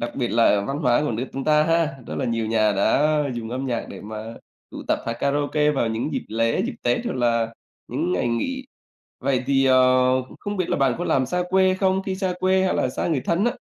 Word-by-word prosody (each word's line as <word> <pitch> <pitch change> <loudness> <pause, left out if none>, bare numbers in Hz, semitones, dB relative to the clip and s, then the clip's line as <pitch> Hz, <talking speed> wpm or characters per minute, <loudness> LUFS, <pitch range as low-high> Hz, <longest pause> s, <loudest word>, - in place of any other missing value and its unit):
đặc 120 - -3
biệt 125 -3 -1
là 110 -3 +3
văn 140 +1 -3
hóa 125 -3 +2
của 150 - -1
nước 120 +4 -3
chúng 135 0 -4
ta 150 0 +4
ha, 165 -3 +1
rất - - -5
là 135 - -1
nhiều 115 -2 -1
nhà 110 -1 +2
đã 145 +10 +2 0.2
dùng 115 -1 -5
âm 130 +2 -3
nhạc 120 -3 -2
để - - -9
mà 110 +2 -7 0.4
tụ - - -8
tập - - +2
hát 115 - -1
karaoke 145 +1 +1
vào 135 -5 0
những 115 +7 -2
dịp - - -3
lễ, 115 +1 0
dịp - - -4
Tết 120 0 0
hoặc - - -2
là 115 -2 0 0.3
những 90 - -1
ngày 90 +6 0
nghỉ. 260 - -2 0.6
Vậy 130 -1 0
thì, 135 -1 +3
ờ, 130 0 +4 0.2
không 205 0 -4
biết 185 - -1
là - - 0
bạn 135 -3 +2
có 175 - -3
làm 130 -1 +2
xa 180 +7 -1
quê 190 0 +3
không? 190 0 +1
Khi 190 -1 -3
xa 185 -1 -1
quê 190 0 +2
hay - - +1
là - - 0
xa - - -3
người 155 -6 0
thân 175 +6 +1
á, 240 - +2
130 Hz, 245 wpm, -23 LUFS, 115-165 Hz, 0.6 s, ta